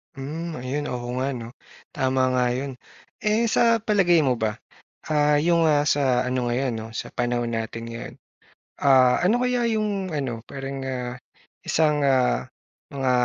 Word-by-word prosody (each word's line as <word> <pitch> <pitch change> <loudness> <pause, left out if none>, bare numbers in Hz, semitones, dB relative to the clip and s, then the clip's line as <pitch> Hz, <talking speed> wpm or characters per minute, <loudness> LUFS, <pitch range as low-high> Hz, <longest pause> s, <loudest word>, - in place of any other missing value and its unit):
Hmm, 155 +4 -5
ayun 140 +4 -3
oo 120 -1 -4
nga 135 +2 0
'no, 120 -4 -6 0.5
tama 130 0 +1
nga 125 -1 +2
'yon. 130 +2 -3 0.5
Eh, 215 +2 +2
sa 230 +1 +3
palagay 195 -6 +3
mo 135 -5 +2
ba, 110 -2 -2 0.5
ah, 150 -1 +3
'yong, 165 +2 +3
ah, 145 -1 +3
sa 135 -4 +2
ano 125 -1 -1
ngayon 125 +2 0
'no, 110 - -7
sa - - -5
panahon 120 -1 -1
natin 115 0 -4
ngayon, 115 +1 -7 0.6
ah, 130 -3 +5
ano 230 +6 +3
kaya 250 -1 +1
'yong 210 -5 -1
ano 120 -6 -3
parang, 135 0 -6
ah, 125 -1 -4 0.5
isang 150 -2 +2
ah, 125 - +2 0.5
mga 135 -2 0
135 Hz, 155 wpm, -24 LUFS, 125-165 Hz, 0.6 s, ah